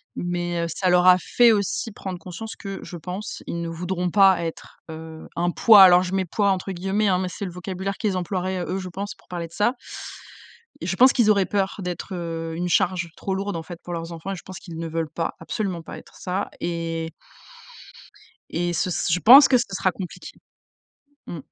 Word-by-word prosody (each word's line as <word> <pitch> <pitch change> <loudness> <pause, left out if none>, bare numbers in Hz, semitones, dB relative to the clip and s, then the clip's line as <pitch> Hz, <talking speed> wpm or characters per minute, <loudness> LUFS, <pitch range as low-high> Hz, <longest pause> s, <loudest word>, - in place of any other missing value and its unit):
mais 175 -1 -2
heu, - - -1
ça 185 +1 0
leur 180 0 +4
a 180 0 +8
fait 240 +6 +4
aussi 210 +2 -1
prendre 190 -3 -6
conscience 215 +5 -8
que, 195 -2 -7
je 180 - -8
pense, 180 +5 -6
ils 170 - -3
ne 170 - -3
voudront 180 +2 -2
pas 190 -2 +5
être, 165 -1 -7
heu, 160 0 -9
un 175 +1 0
poids. 210 +1 +8
Alors 180 -1 +7
je 185 0 -4
mets 190 -1 +1
«poids» 200 -2 +2
entre 190 +1 -2
guillemets, 195 +3 0
hein, 185 - +3
mais 185 - -1
c'est 185 - -7
le 180 - -5
vocabulaire 190 +2 -4
qu'ils 205 -4 -1
emploieraient, 185 0 -2
eux, 185 - -2
je 185 - -6
pense, 200 +4 -5
pour - - -26
parler 175 -2 -5
de - - -25
ça. 210 +6 +2 1.1
Et 170 - -5
je 190 - -1
pense 255 +5 +7
qu'ils 235 -4 +3
auraient 200 -2 +4
peur 195 -1 -1
d'être, 180 +2 -5
heu, 165 -1 -4
une 175 +1 -2
charge 180 -1 +1
trop 190 - -2
lourde, 195 -1 -3
en 165 - -5
fait, 170 +1 -9
pour 175 - -8
leurs 165 0 -5
enfants 165 +4 -6
et - - -3
je 180 - -11
pense 185 - -8
qu'ils 165 -4 -9
ne 165 - -3
veulent 160 -1 -3
pas, 165 - -2
absolument 180 +1 -3
pas - - -9
être - - -15
ça 185 +2 -3
et 165 -1 -3 1.4
et 175 +1 -1
ce 175 +2 0
ce 165 - -1
je 180 - +2
pense 270 +7 +9
que 260 - +5
ca 230 -5 -1
sera 185 0 +1
compliqué, 180 -2 -8 0.9
mmh. 170 - -6
180 Hz, 220 wpm, -23 LUFS, 170-195 Hz, 1.4 s, pense